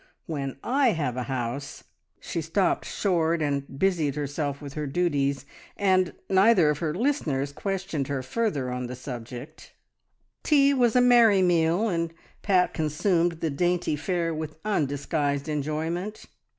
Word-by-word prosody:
When 140 -5 -4
I 260 -1 +3
have 145 -7 -2
a 125 - -2
house 130 +2 -4 0.2
" - - -52
She 165 - -4
stopped 165 +5 0
short 170 -4 0
and 140 -2 -2
busied 160 -5 +1
herself 145 -1 -3
with 140 -2 -8
her 150 -1 -3
duties, 140 -3 0 0.3
and 185 -3 +2
neither 190 -5 +5
of 150 - -3
her 155 -2 -2
listeners 165 - 0
questioned 185 -5 -3
her 140 -2 -2
further 140 - -1
on 125 0 -3
the 125 - -6
subject. 125 +3 -9 0.7
Tea 280 -2 +4
was 245 -4 +2
a 250 - +6
merry 235 -6 +6
meal, 175 +4 +2
and 170 -4 -1 0.3
Pat 185 -3 +2
consumed 165 +2 0
the 160 - 0
dainty 175 +2 0
fare 170 +2 -1
with 155 0 -5
undisguised 145 -5 -1
enjoyment. 160 +7 -3
160 Hz, 145 wpm, -26 LUFS, 140-190 Hz, 0.7 s, a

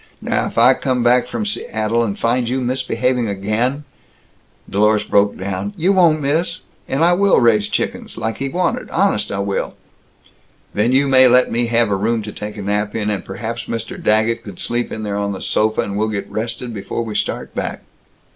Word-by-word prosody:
Now - - -1
if - - -9
I - - +7
come 130 -2 -1
back 120 +1 +3
from 115 -3 -3
Seattle 110 +2 -1
and 105 -4 -2
find 120 0 0
you 130 +2 0
misbehaving 125 -1 0
again 110 +8 -1 0.4
" - - -37
Dlorus 105 +2 +2
broke 100 0 +2
down. 95 +1 -4
"You 185 +5 +2
won't, 165 -5 +4
miss! 165 +5 0 0.3
And 140 +4 0
I 175 - +5
will 200 +2 +4
raise 110 -4 +3
chickens, - - -3
like 110 0 -3
he 135 - -3
wanted, 180 +5 -1
honest 185 - +1
I 100 - -2
will!" 100 0 -2 1.0
"Then 105 +4 +1
you 135 +2 +3
may 130 -1 +6
let 125 +1 +4
me 120 +1 +1
have 115 -2 +2
a - - +2
room 110 +3 0
to 105 - -6
take 105 +1 -7
a 100 - -5
nap 105 +1 -1
in, 105 -2 -1
and 100 -3 -3
perhaps 115 +4 -5
Mr. 115 0 -5
Daggett 110 +2 +2
could 100 -4 -10
sleep 120 0 -1
in 110 - -5
there 100 -1 -2
on 100 0 -1
the 95 - -6
sofa, 110 +3 +1
and 100 - -4
we'll 110 +1 0
get 100 -2 -4
rested 115 +2 -4
before 100 +3 -4
we 110 -2 -5
start - - -3
back." - - -4
115 Hz, 205 wpm, -19 LUFS, 105-125 Hz, 1.0 s, I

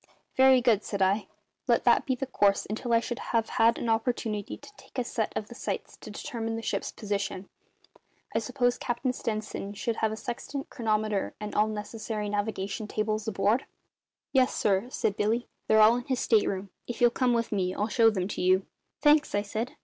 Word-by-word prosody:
"Very 260 -1 +6
good," 230 -4 +3
said 200 - -4
I. 200 +3 +1 0.4
"Let - - +3
that - - +4
be 260 - +1
the 270 - -3
course 200 -6 +2
until 220 +3 -3
I 230 - +5
shall 240 0 -4
have 225 -1 0
had 230 +1 +3
an - - -3
opportunity 225 -2 -1
to - - -14
take - - -16
a 250 - +1
set 230 -2 -2
of 215 - -2
sights - - -4
to - - -11
determine 225 -2 -4
the 225 - -5
ship's - - -2
position. 200 -2 -3 0.9
I - - +2
suppose 245 +1 0
Captain 245 +1 -1
Stenson 215 -3 -4
had 220 +1 -1
a - - -3
sextant, 265 +4 -5
chronometer, 215 -4 -1
and 210 0 -5
all 210 +1 +3
necessary 215 0 -4
navigation 205 0 -2
tables 215 0 -2
aboard?" 210 +4 +1 0.7
"Yes, 260 -2 +3
sir," 200 +3 +1
said 210 -5 -1
Billy. 225 +4 0 0.2
"They're 220 0 +5
all 220 +3 +7
in 245 - -5
his 260 -2 -1
state 220 -3 +3
room. 195 0 -3 0.2
If 240 - -5
you'll 240 -1 +5
come 250 0 +2
with 230 0 -1
me 185 -3 0
I'll 210 - 0
show 225 0 +5
them 190 -4 -1
to - - -4
you." 185 +1 +3 0.4
"Thanks," 300 -5 +4
I 205 - +1
said. 220 +4 -4
220 Hz, 195 wpm, -28 LUFS, 205-240 Hz, 0.9 s, all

